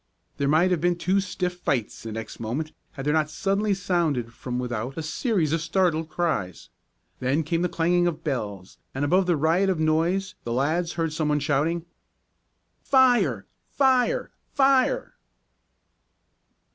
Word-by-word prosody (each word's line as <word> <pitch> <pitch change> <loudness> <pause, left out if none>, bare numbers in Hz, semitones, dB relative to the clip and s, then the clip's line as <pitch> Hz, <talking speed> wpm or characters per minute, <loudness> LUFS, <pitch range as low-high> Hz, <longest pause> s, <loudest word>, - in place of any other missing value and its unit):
There 140 - 0
might 160 +6 +3
have 175 -4 +1
been 175 0 +2
two 185 +3 +1
stiff 180 -2 -3
fights 125 -10 -2
the 115 - -6
next 110 0 -7
moment 130 +8 -3 0.2
had 135 -2 -7
there 150 - +2
not 155 -1 +1
suddenly 195 +5 0
sounded 160 -11 -1
from 125 +1 -5
without 125 +1 -3
a 160 - -3
series 165 - 0
of 165 - 0
startled 165 -1 +1
cries. 155 - -2 0.5
Then 135 +5 +1
came 165 +2 -1
the 180 - +1
clanging 175 +2 +2
of 165 -2 -3
bells, 105 - -4 0.2
and 140 +2 0
above 180 +5 +3
the 175 -3 +2
riot 165 +6 +2
of 185 -4 0
noise 170 +5 +1
the 115 - -3
lads 160 +7 0
heard 165 -2 -2
some 155 -1 -1
one 150 0 +2
shouting: 155 +4 0 1.0
"Fire! 240 - +3 0.2
Fire! 265 - +2 0.2
Fire!" 275 - +2
165 Hz, 155 wpm, -25 LUFS, 140-180 Hz, 1.0 s, might